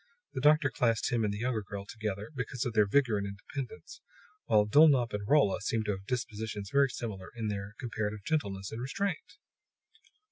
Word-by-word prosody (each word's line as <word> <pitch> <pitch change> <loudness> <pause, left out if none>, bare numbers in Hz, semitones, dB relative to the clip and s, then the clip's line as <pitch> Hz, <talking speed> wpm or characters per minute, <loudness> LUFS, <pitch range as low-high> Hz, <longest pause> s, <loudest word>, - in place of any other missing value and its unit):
The - - -3
doctor 150 -1 +5
classed 115 0 +1
him 120 -2 +1
and 105 - +1
the 100 - -4
younger 120 0 -1
girl 100 0 -7
together 105 0 -5
because 125 -2 -3
of 120 - -2
their 105 -2 +4
vigor 115 -2 +3
and 100 - -3
independence, 130 - -7 0.4
while 105 -1 +4
Dulnop 135 0 +5
and 100 0 -3
Rolla 140 -10 +4
seemed 110 0 -1
to 105 - +1
have 95 0 -6
dispositions 110 -4 -3
very 140 -1 +5
similar 105 -6 -6
in 110 -2 -2
their 100 +1 -5
comparative 105 -3 -3
gentleness 100 -11 -2
and 110 - -5
restraint. 180 - -3
110 Hz, 180 wpm, -31 LUFS, 105-130 Hz, 0.4 s, doctor